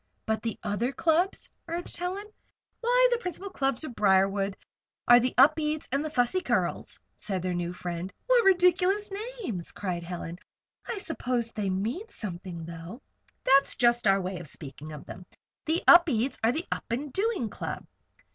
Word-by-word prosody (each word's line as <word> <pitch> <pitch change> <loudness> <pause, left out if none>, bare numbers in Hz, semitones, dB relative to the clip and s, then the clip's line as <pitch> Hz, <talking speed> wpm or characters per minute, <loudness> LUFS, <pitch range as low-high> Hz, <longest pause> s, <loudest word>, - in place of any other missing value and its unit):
"But 220 0 0
the 225 -2 -3
other 220 +4 -1
clubs?" 335 +6 +1 0.2
urged 340 +1 -4
Helen. 370 +4 -3 0.5
"Why, - - +4
the 480 - +2
principal 380 -1 -5
clubs 270 -4 -1
of 305 - -6
Briarwood 195 -1 +2 0.5
are 240 0 +9
the 250 +1 -1
Upedes 305 +3 +4
and 275 +2 +1
the 310 - -3
Fussy 275 +6 +1
Curls," - - -1 0.2
said 190 -4 -3
their 185 -1 -1
new 175 0 -2
friend. 180 +1 -5
"What - - +4
ridiculous 380 +2 +3 0.3
names!" 185 - -4
cried 180 -4 -3
Helen. 170 0 -6 0.5
"I 460 - -3
suppose 250 - -2
they 205 -4 -2
mean 225 - -2
something, 175 - -6
though?" 170 +7 -8 0.4
"That's 275 +1 +4
just 240 -2 +3
our 195 0 +5
way 185 -1 -4
of 175 - -9
speaking 145 +1 -9
of 150 -1 -9
them. 185 - -9 0.4
The 325 +2 0
Upedes 280 -8 +6
are 225 - +5
the 320 +7 -3
Up - - -2
and 265 +3 -3
Doing 405 - 0
Club. - - -5
240 Hz, 165 wpm, -28 LUFS, -, 0.5 s, are